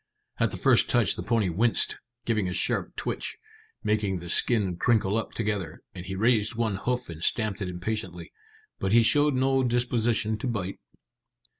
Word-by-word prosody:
At - - +2
the - - -5
first - - +4
touch - - +3
the - - -5
pony 110 -5 0
winced, 110 +7 +2 0.3
giving 110 -5 0
a - - -3
sharp - - 0
twitch, - - -3 0.5
making 105 -3 0
the 85 0 -8
skin 100 -3 +2
crinkle 105 -1 +2
up 115 - -2
together; 105 -7 -3
and 90 - -8
he 95 - -4
raised 110 +2 +2
one 110 -4 -1
hoof 125 +4 -2
and 85 -1 -8
stamped 110 -3 0
it 95 - -2
impatiently, 90 -2 -5 0.5
but 95 +1 -1
he 115 0 +6
showed 145 +5 +4
no 135 +1 +2
disposition 120 -3 0
to 130 - -3
bite. 100 -5 -3
110 Hz, 170 wpm, -26 LUFS, 95-120 Hz, 0.5 s, he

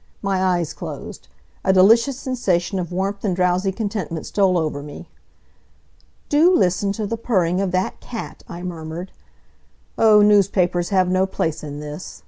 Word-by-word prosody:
My 195 -1 0
eyes 175 -4 0
closed. - - -8 0.4
A 190 - +3
delicious 230 +8 +4
sensation 195 -9 -1
of 175 -2 -4
warmth 195 +2 -2
and 195 -4 0
drowsy 180 +1 +1
contentment 200 -6 -4
stole 190 -3 +2
over 155 -3 -2
me. 145 0 -10 1.2
"Do 315 +5 +4
listen 185 - +1
to 215 +1 -3
the 230 +3 -3
purring 185 -6 0
of 195 - 0
that 185 +1 -1
cat!" 230 -2 -8
I 175 +1 -7
murmured. 170 0 -6 0.9
"Oh, 215 -2 +6
newspapers 185 -4 +3
have 190 -3 +2
no 185 +1 +2
place 160 -4 -3
in 145 0 -6
this. 150 +3 -8
185 Hz, 150 wpm, -21 LUFS, 175-205 Hz, 1.2 s, Oh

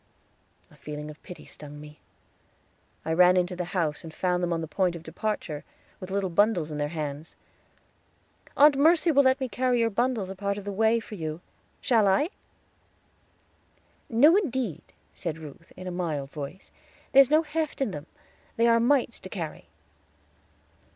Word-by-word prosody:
A - - -18
feeling 150 0 -7
of 150 - -16
pity 180 - -11
stung 145 0 -11
me; 150 0 -12 1.1
I 160 - 0
ran 180 +2 +6
into 180 0 0
the 180 0 -3
house, 165 -4 -2
and 165 - -8
found 180 +2 0
them 175 -1 -1
on 165 -1 0
the 160 - -4
point 180 +1 0
of 165 - -9
departure, 165 -3 -4 0.4
with 185 - -8
little 195 -1 -1
bundles 175 -4 +2
in 150 - -4
their 145 - 0
hands. 150 -1 -6 1.2
"Aunt 290 0 +7
Mercy 325 +4 +4
will 280 -2 +5
let 260 0 +3
me 260 - -2
carry 250 0 0
your 230 -1 +2
bundles 230 -3 0
a - - -7
part 200 +1 -2
of 205 - -7
the 205 - -3
way 220 +3 +3
for 220 - -11
you; 160 -4 -4 0.4
shall 225 -5 +3
I?" 200 - +2 1.8
"No, 285 +9 +6
indeed," 255 - -1 0.3
said 165 -3 -4
Ruth, 160 +1 -12
in 185 - -8
a 180 - -4
mild 155 -6 -3
voice; 150 +5 -8 0.4
"there's 270 -1 +7
no 310 +2 +4
heft 310 0 -3
in 270 -7 0
them; 150 -2 -7 0.5
they 230 - +3
are 230 0 +5
mites 245 0 +2
to 185 - -9
carry." 165 -6 -6
190 Hz, 170 wpm, -27 LUFS, 160-240 Hz, 1.8 s, Aunt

